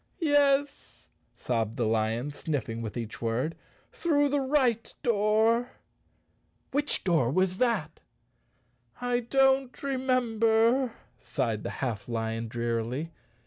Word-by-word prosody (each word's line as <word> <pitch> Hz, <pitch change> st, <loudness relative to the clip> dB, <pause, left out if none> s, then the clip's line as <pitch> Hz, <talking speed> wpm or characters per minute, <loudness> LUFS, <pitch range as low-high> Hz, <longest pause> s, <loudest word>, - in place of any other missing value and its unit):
"Yes!" 285 Hz, -3 st, +1 dB, 0.2 s
sobbed 115 Hz, -2 st, -2 dB
the 120 Hz, -, +1 dB
lion, 115 Hz, +5 st, 0 dB
sniffing 135 Hz, -7 st, -3 dB
with 110 Hz, 0 st, -5 dB
each 115 Hz, -2 st, -6 dB
word, 120 Hz, +8 st, -1 dB, 0.4 s
"through 290 Hz, -4 st, +1 dB
the 285 Hz, +1 st, +1 dB
right 260 Hz, -5 st, +1 dB
door." 225 Hz, +2 st, +2 dB, 1.0 s
"Which 290 Hz, +2 st, 0 dB
door 165 Hz, -10 st, +2 dB
was 185 Hz, +5 st, +1 dB
that?" 220 Hz, -11 st, 0 dB, 1.0 s
"I 245 Hz, 0 st, 0 dB
don't 265 Hz, +2 st, +2 dB
remember," 245 Hz, -2 st, +2 dB, 0.3 s
sighed 110 Hz, -2 st, -2 dB
the -, -, -4 dB, 0.2 s
half 115 Hz, -2 st, -4 dB
lion 115 Hz, 0 st, -2 dB
drearily. 120 Hz, +6 st, -2 dB
210 Hz, 105 wpm, -28 LUFS, -, 1.0 s, door